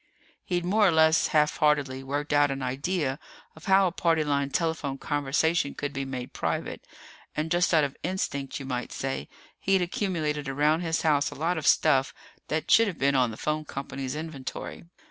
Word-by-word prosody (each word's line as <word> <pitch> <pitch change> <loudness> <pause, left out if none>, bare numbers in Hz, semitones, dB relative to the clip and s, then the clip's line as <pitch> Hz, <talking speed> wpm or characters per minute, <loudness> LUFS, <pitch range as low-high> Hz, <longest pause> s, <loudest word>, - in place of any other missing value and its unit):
He'd 175 -1 -2
more 205 +3 +4
or - - +4
less 160 0 +4
half 150 -1 +2
heartedly 145 -4 +1
worked 145 +3 -3
out 145 0 +4
an 135 -1 -3
idea 140 +2 -1 0.4
of 160 - -14
how 195 0 +5
a 180 - +1
party 165 -3 +1
line 140 -2 0
telephone 145 -2 -1
conversation 145 +2 0
could 145 -1 -4
be 135 -1 -3
made 130 -2 -6
private, - - -3 0.5
and 155 +1 -2
just 175 0 +2
out 160 -3 +4
of 140 -1 -2
instinct, 145 -7 -3
you 135 - -7
might 125 -2 -4
say, 135 0 -4 0.3
he'd 190 -1 +2
accumulated 165 - -2
around 150 +3 +2
his 165 -2 -1
house 145 -3 +2
a - - -10
lot 165 +3 -1
of 150 - -3
stuff 135 0 +3 0.3
that 155 +1 -2
should 225 0 +6
have 185 -6 -4
been 140 +1 +2
on 130 -3 +3
the 110 - -8
phone 155 0 -1
company's 135 -2 -5
inventory. 155 -1 -6
150 Hz, 185 wpm, -27 LUFS, 135-165 Hz, 0.5 s, should